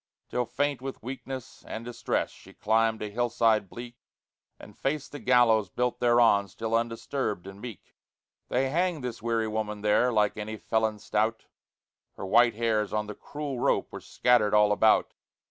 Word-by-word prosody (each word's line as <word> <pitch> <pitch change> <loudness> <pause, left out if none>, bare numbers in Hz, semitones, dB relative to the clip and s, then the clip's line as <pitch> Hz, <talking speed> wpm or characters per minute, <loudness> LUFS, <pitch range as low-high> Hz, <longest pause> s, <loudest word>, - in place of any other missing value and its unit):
Till 125 -1 -1
faint 145 -3 -1
with 135 -3 -7
weakness 130 -1 -7
and 115 - -6
distress, 120 -1 -2
She - - -16
climbed 110 +1 +1
a 105 - -5
hillside 115 -3 +1
bleak, 120 0 -9 0.6
And - - -14
faced 140 +1 -3
the 145 - -7
gallows 115 -6 +4
built 125 +6 -1
thereon, 120 -4 +4
Still 110 +4 -5
undisturbed 115 -3 -2
and 95 +1 -10
meek. 120 -6 -10 0.5
They 130 +1 0
hanged 170 -2 0
this 120 -3 -5
weary 115 -1 0
woman 105 -1 -3
there, 105 +4 +3
Like 105 -2 +1
any 110 +1 -5
felon 110 0 0
stout; 110 +2 -1 0.7
Her - - -6
white 120 +4 +4
hairs 110 -2 0
on 105 0 0
the 105 - -6
cruel 145 +2 -6
rope - - +1
Were - - -8
scattered 105 - +2
all 105 0 +5
about. 110 +1 +3
115 Hz, 165 wpm, -28 LUFS, 105-125 Hz, 0.7 s, all